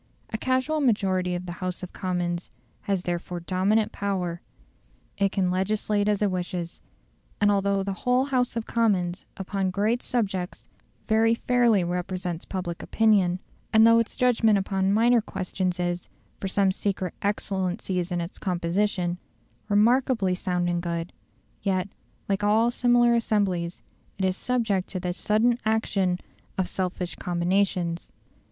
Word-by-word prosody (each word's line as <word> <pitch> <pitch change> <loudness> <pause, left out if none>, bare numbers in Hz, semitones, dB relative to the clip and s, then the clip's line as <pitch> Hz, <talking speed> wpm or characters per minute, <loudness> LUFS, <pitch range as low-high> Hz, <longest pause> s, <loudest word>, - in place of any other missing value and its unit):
A - - 0
casual 260 +5 +1
majority 190 -7 +1
of 175 +1 -4
the 175 - -5
House 185 0 -3
of 185 - -7
Commons 175 -2 -2 0.4
has 195 -3 +1
therefore 175 0 -3
dominant 190 +5 +1
power: 180 -4 -2 0.8
it 200 -1 +2
can 185 -3 +1
legislate 205 +2 0
as 210 0 +1
it 200 - +2
wishes. 175 -1 -4 0.6
And 205 0 +4
though 200 -1 +1
the 195 0 -2
whole 250 +1 +3
House 255 -4 0
of 230 -1 -2
Commons 195 -6 0
upon 190 0 -1
great 210 +6 +1
subjects 195 -7 -2 0.4
very 225 +1 +4
fairly 235 -5 +3
represents 180 0 -3
public 180 -3 -4
opinion, 200 -5 +3 0.3
and 220 0 +6
though 230 0 +7
its 230 - -2
judgment 225 -4 +4
upon 195 0 0
minor 230 +3 +4
questions 185 -2 -3
is, 175 0 -2 0.3
from 195 - -3
some 195 0 +3
secret 185 -2 -2
excellencies 190 -3 -1
in 175 -1 0
its 170 +2 -7
composition, 180 0 0 0.5
remarkably 225 -1 +3
sound 180 -1 -1
and 175 0 0
good; 170 0 -3 0.5
yet, 190 0 0 0.4
like 200 0 0
all 220 +3 +4
similar 240 -1 +4
assemblies, 195 -7 0 0.3
it 190 - 0
is 185 -1 +1
subject 220 -6 0
to 185 - -3
the 180 0 -2
sudden 225 +6 +2
action 200 -5 +1 0.4
of 190 -1 +1
selfish 180 -1 -3
combinations. 175 -1 0
195 Hz, 140 wpm, -26 LUFS, 180-220 Hz, 0.8 s, though